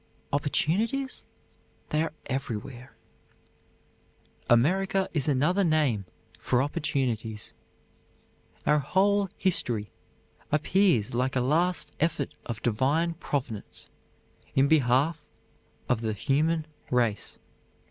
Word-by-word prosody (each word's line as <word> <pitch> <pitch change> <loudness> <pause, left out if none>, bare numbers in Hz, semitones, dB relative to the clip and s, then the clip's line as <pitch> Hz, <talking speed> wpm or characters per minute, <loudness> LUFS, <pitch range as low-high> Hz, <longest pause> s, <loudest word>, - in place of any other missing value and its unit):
Opportunities? 210 - 0 0.7
They 150 - +2
are 165 - -1
everywhere. 125 -1 -5 1.5
"America 190 +10 +3
is 145 -4 +1
another 150 +8 +2
name 150 - +2 0.3
for 125 +1 +2
opportunities. 130 -8 -2 1.1
Our 150 0 +4
whole 195 +7 +2
history 120 - 0 0.6
appears 155 - +2
like 130 +2 0
a - - +3
last 170 +8 +1
effort 160 -1 0
of 115 -3 -5
divine 140 +9 +1
Providence 130 -9 -4 0.7
in 135 +1 +5
behalf 150 +2 +3 0.6
of 125 -3 +1
the 110 -1 -1
human 150 - +1 0.2
race." 120 -4 0
145 Hz, 90 wpm, -28 LUFS, 125-165 Hz, 1.5 s, in